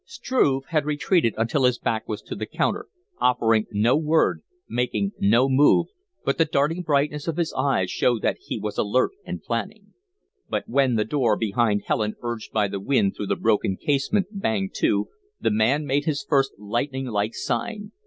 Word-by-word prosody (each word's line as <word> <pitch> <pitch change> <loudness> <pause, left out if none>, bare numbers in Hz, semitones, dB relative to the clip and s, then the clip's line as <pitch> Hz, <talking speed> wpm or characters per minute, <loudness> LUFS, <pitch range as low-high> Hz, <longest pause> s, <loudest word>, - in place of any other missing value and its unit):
Struve 135 - 0
had 155 -4 +1
retreated 150 - +1
until 115 +5 +1
his 125 -1 +3
back 110 -2 -2
was 105 - -4
to - - -7
the - - -5
counter, - - -1 0.3
offering 115 -3 +2
no 110 +4 +2
word, 160 +1 +2 0.3
making 125 +11 -1
no 115 +6 +4
move, 135 +2 +4 0.4
but 140 - 0
the 165 - +5
darting 150 +3 0
brightness 150 -1 0
of 165 -1 -2
his 170 -2 -1
eyes 130 -9 0
showed 120 -3 +1
that - - +1
he - - -5
was 105 -1 -4
alert 110 +5 +2 0.2
and - - -5
planning. - - -4 0.6
But - - -2
when 130 -1 +2
the 105 -1 +1
door 115 -4 +1
behind 110 -1 +1
Helen, 110 -1 0
urged 120 -2 -5
by 105 -2 +1
the 100 0 -4
wind 100 -2 +1
through 105 - -4
the - - +1
broken 105 -4 +1
casement, 145 +8 +1
banged 110 - -2
to, 100 0 +1 0.3
the - - +1
man 120 +8 +2
made 140 +1 0
his 155 +4 -1
first 135 -2 +2
lightning 120 +6 -2
like 110 -2 -1
sign. 205 - -3
125 Hz, 180 wpm, -24 LUFS, 110-145 Hz, 0.6 s, the